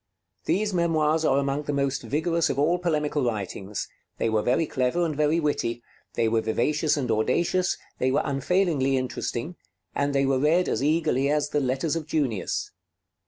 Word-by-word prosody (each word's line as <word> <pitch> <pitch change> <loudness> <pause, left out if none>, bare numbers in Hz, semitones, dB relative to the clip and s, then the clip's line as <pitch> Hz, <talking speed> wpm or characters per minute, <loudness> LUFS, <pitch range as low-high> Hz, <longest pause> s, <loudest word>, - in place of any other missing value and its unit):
These 205 +1 0
memoirs 160 -2 +2
are 135 - +3
among 140 +1 -1
the 145 - -2
most 140 -1 0
vigorous 160 +7 0
of - - -2
all 165 +5 +2
polemical 150 -4 0
writings; 105 -3 -3 0.3
they 115 - 0
were 110 -1 +1
very 130 +9 +1
clever 130 +6 0
and 155 -3 -2
very 150 +3 +2
witty; 120 -6 -1 0.3
they 115 -1 +2
were 110 0 +2
vivacious 150 +8 +1
and 125 -5 -1
audacious; 170 - +1 0.2
they 130 - +2
were 135 +3 +1
unfailingly 140 -1 +1
interesting; 130 +5 -3 0.4
and 140 0 -1
they 135 0 +3
were 135 -1 +2
read 165 +6 +3
as - - -1
eagerly 145 -3 +2
as 150 0 +1
the 150 - +1
'Letters 135 +4 -1
of 160 -2 -4
Junius.' 135 -10 -1
145 Hz, 170 wpm, -25 LUFS, 130-160 Hz, 0.4 s, are